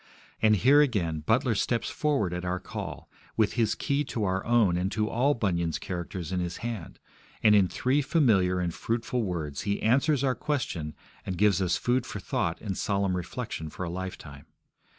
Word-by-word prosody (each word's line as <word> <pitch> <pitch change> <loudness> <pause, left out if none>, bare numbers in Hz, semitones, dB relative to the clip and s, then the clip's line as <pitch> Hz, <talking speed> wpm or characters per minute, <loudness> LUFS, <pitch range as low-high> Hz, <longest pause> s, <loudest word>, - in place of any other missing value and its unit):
And 110 -1 +5
here, 135 +8 +6
again, 95 - +1
Butler 115 - +2
steps 115 +3 0
forward 140 - 0
at 90 0 -4
our 90 0 -1
call - - -7 0.3
with 110 -2 +3
his 115 -3 +1
key 140 0 0
to 115 -4 -3
our 95 -1 0
own 115 -7 +4
and 90 +2 -1
to 110 -1 0
all 135 +6 +2
Bunyan's 85 -7 0
characters 85 -1 -5
in 90 - 0
his 85 -1 -3
hand, 115 -8 -5 0.5
and 105 - +7
in 100 -3 +5
three 130 +9 +1
familiar 105 - +3
and 90 -2 -1
fruitful 115 +4 -2
words 80 -8 -3
he 100 0 -1
answers 135 +5 +2
our 130 -2 +2
question 105 - -3 0.3
and 95 -2 -4
gives 100 -2 +3
us 90 -2 +1
food 125 0 0
for 105 - -5
thought 95 - -2
and 100 -3 -3
solemn 100 -2 0
reflection 80 -2 -4
for 90 - -6
a 85 - -3
lifetime. 85 -6 -7
100 Hz, 185 wpm, -28 LUFS, 90-120 Hz, 0.5 s, and